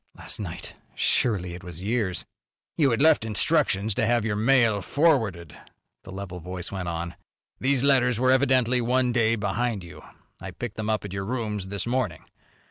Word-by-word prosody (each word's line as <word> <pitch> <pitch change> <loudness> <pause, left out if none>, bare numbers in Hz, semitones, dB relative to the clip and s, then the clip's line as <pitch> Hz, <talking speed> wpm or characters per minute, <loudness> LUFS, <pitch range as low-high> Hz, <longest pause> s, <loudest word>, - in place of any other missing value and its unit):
Last - - -5
night! 85 -4 -6 0.2
Surely 95 -7 +1
it 90 +2 -9
was 90 -1 -8
years. 105 -4 -1 0.5
"You 145 -4 +3
had 115 +3 +1
left 160 -6 +5
instructions 110 -2 +1
to 115 - 0
have 120 -2 +2
your 105 -2 0
mail 115 -2 +3
forwarded," 105 - +1 0.5
the 95 - -10
level 95 -2 -6
voice 90 +1 -6
went 95 -3 -4
on. 85 +1 -4 0.5
"These 135 0 +2
letters 125 -4 +3
were 130 +1 +4
evidently 130 -2 +3
one 125 +1 +2
day 115 -2 +2
behind 105 0 -2
you. 75 -3 -11 0.4
I 95 - -7
picked 110 +4 -6
them 110 0 -3
up 110 -2 0
at 100 - -7
your 95 0 -3
rooms 105 -4 -3
this 100 0 -3
morning. 130 +2 -2
110 Hz, 175 wpm, -25 LUFS, 95-125 Hz, 0.5 s, left